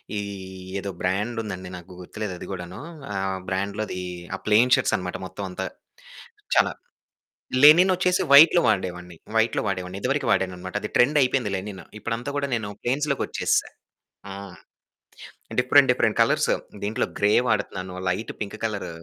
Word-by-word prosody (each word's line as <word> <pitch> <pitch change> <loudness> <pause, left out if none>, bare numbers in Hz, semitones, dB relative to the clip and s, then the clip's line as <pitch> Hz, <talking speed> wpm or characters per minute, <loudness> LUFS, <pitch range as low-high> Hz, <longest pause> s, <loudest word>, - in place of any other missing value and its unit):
ఈ - - -1 0.6
ఏదో 100 - -5
బ్రాండుందండి 100 -1 -2
నాకు 90 +1 -13
గుర్తులేదు. 100 +2 -5
అది - - -8
కూడాను 90 +1 -7 0.3
ఆ! - - -4 0.3
బ్రాండ్‌లోది 100 +1 -3 0.4
ఆ! - - -6
ప్లెయిన్ 110 +4 +4
షర్ట్స్ - - 0
అన్నమాట 90 -3 -4
మొత్తమంతా, 95 -1 -5 0.9
చాలా - - +4 0.9
లెనినోచ్చేసి 180 +3 +6
వైట్‌లో 160 +5 +9
వాడేవాన్ని 90 -3 -2 0.2
వైట్‌లో 110 +1 +2
వాడేవాన్ని. 90 -1 -3
ఇదివరకు 140 +3 0
వాడనన్నమాట, 95 -1 -2
అది 105 - -4
ట్రెండ్ 145 +5 +4
అయిపోయింది. 125 -5 +1
లెనిన్ 95 0 -6 0.2
ఇప్పుడంతా 120 +4 -3
కూడా 140 -1 -1
నేను 110 -3 -3
ప్లెయిన్స్‌లోకి 140 +3 0
వచ్చేసా. - - 0 0.6
హ్మ్. 100 -1 -8 1.0
డిఫరెంట్, - - +5
డిఫరెంట్ - - +1
కలర్స్, - - +3 0.3
దీంట్లో 105 +2 0
గ్రే 100 +1 +3 0.2
వాడుతున్నాను, 95 -3 -2
లైట్ 100 +5 -3
పింక్ 105 +1 -5
కలర్ 105 -3 -3
105 Hz, 130 wpm, -24 LUFS, 95-120 Hz, 1.0 s, వైట్‌లో